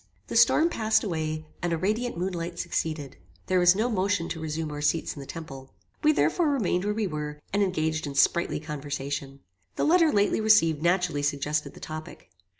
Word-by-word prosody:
The - - -4
storm 330 +2 +5
passed 220 -7 +1
away, 155 -5 -3 0.2
and 175 - -1
a 165 - +1
radiant 215 +6 -1
moon 185 +2 -2
light 170 0 -5
succeeded. 155 -5 -3 0.3
There 185 - +2
was 180 +1 +6
no 220 +4 +1
motion 200 -5 0
to 165 - -4
resume 160 0 -3
our 145 0 -5
seats 150 +2 0
in - - -9
the 135 - -9
temple. 135 -5 -9 0.3
We 305 - +6
therefore 300 - +2
remained 205 -9 0
where 210 - 0
we 220 -1 0
were, 150 -4 -4
and 205 - +2
engaged 160 -5 0
in 140 - -6
sprightly 170 +4 +2
conversation. 145 -2 -5 0.3
The - - -1
letter 330 -1 +4
lately 205 +1 +2
received 165 -9 +4
naturally 175 -3 +1
suggested 145 +1 -1
the - - -12
topic. 155 - -9
165 Hz, 190 wpm, -27 LUFS, 150-200 Hz, 0.3 s, was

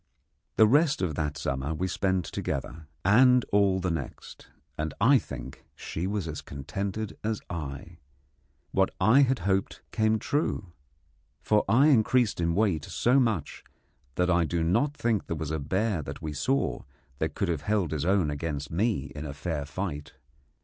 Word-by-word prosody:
The 110 - +7
rest 140 - +3
of 85 -4 0
that 75 0 -2
summer 70 +3 -2
we 95 +4 -1
spent 95 -1 0
together, 80 -1 -4 0.2
and 125 +4 +6
all 100 -2 +3
the 90 -1 -1
next, 80 -5 -7 0.3
and 75 -1 -3
I 130 +6 +6
think 65 - -9
she 85 +3 -4
was 100 -4 -2
as 75 -2 -5
contented 100 +9 -5
as 110 -1 -1
I. 70 -6 -6 0.7
What 95 0 +2
I 110 +8 +6
had 130 -1 +3
hoped 95 -1 0
came 110 0 +2
true, 105 - -2 0.7
for 105 -1 +3
I 130 +8 +5
increased 120 -5 +3
in 85 0 +1
weight 100 -7 +1
so 125 +3 +2
much 110 - -1 0.5
that 90 0 +2
I 85 -1 +3
do 85 0 -1
not 120 - +1
think 115 -3 0
there 85 - -2
was 75 0 -4
a 80 - -1
bear 95 +5 0
that 70 - -7
we 75 -1 -5
saw 130 - 0 0.4
that - - -2
could - - -1
have 80 -4 -1
held 100 -2 0
his 75 -3 -2
own 90 -4 +2
against 75 -1 -4
me 95 - 0
in 75 -1 -5
fair 75 -1 -3
fight. 75 -2 -5
95 Hz, 165 wpm, -28 LUFS, 80-110 Hz, 0.7 s, The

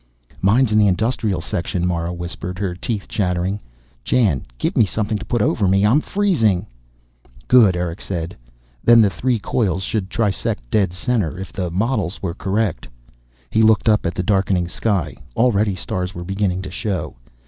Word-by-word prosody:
"Mine's 110 +5 +3
in 105 - +4
the 105 - +5
industrial 105 -1 0
section," 85 +2 -2
Mara 85 -1 -1
whispered, 90 +1 -5
her 95 -2 -2
teeth 100 +3 -4
chattering. 90 0 -1 0.4
"Jan, 100 - +1
give - - -1
me - - +5
something 105 +1 -1
to 105 - -8
put 120 -2 0
over 105 -1 +1
me! 95 +2 +3
I'm 125 +9 +4
freezing." 155 - +1 0.8
"Good," 110 -8 +6
Erick 90 0 -3
said. 85 -2 -4 0.5
"Then 120 0 +7
the 100 -3 +4
three 125 +2 0
coils 100 -4 -1
should 95 -1 -2
trisect 100 - -2
dead 100 -5 +2
center, 95 - -1
if 95 +1 -7
the 90 -2 -2
models 100 0 -1
were 85 -3 -3
correct." 100 0 -1 0.6
He 110 - +3
looked 110 -1 +4
up 105 -4 +3
at 85 - -3
the 90 - -1
darkening 95 -2 +1
sky. 85 - -1 0.2
Already, 110 -4 +2
stars 90 +1 -4
were 85 - -5
beginning 95 0 -1
to - - -7
show. 90 - -3
95 Hz, 170 wpm, -20 LUFS, 90-110 Hz, 0.8 s, Then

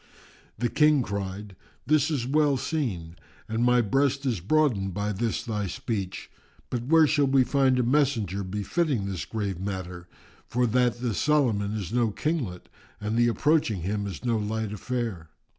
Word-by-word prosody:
The 120 +3 0
King 150 -1 +4
cried, 100 -1 -5 0.3
"This 150 0 +3
is 140 -7 -1
well 145 +1 +2
seen, 100 - -3 0.3
and 110 +2 -1
my 125 0 +4
breast 135 +5 +1
is 120 -7 0
broadened 100 - +1
by 105 +1 -1
this 115 +4 -2
thy 105 -4 -2
speech; 95 +1 -4 0.4
but 120 -1 -2
where 160 +1 +6
shall 145 -2 +2
we 135 -1 +4
find 135 -1 +2
a 125 - +2
messenger 120 - +1
befitting 105 - -1
this 95 -3 -4
grave 100 -5 -3
matter, 90 -2 -5 0.4
for 125 +1 +1
that 120 0 +1
this 120 -5 -1
Solomon 115 -9 +2
is 100 -1 -4
no 120 -2 +2
Kinglet 120 - -3 0.3
and 105 +1 -2
the 120 0 +4
approaching 120 - +1
him 100 +2 -2
is 100 +5 -7
no 115 -2 +1
light 105 0 -2
affair? 105 -7 -4
115 Hz, 160 wpm, -26 LUFS, 100-135 Hz, 0.4 s, where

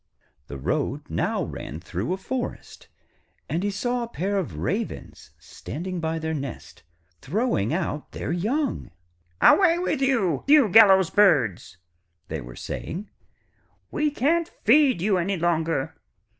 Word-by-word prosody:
The 70 - -7
road 65 - -2
now - - -1
ran 75 - -7
through 90 - -4
a 185 - 0
forest, 245 +6 -6 0.6
and 170 - -2
he 205 - 0
saw 245 +5 -2
a 235 - -3
pair 200 -1 -1
of 110 - -5
Ravens - - -4
standing 180 +6 -7
by 160 0 -2
their 160 0 -3
nest 140 -4 -7 0.4
throwing 180 - 0
out 155 -3 -3
their - - -4
young. 235 - -1 0.5
'Away 345 -4 +6
with 310 -5 -1
you, 215 - +1
you 285 -6 +6
gallows 190 -3 +6
birds,' 135 - +2 0.5
they - - -4
were - - -10
saying. 195 +6 -6 0.8
'We 300 0 +1
can't 315 +5 +1 0.2
feed 255 - +4
you 195 -2 +2
any 190 +3 -1
longer. 165 -4 0
190 Hz, 135 wpm, -24 LUFS, 160-245 Hz, 0.8 s, Away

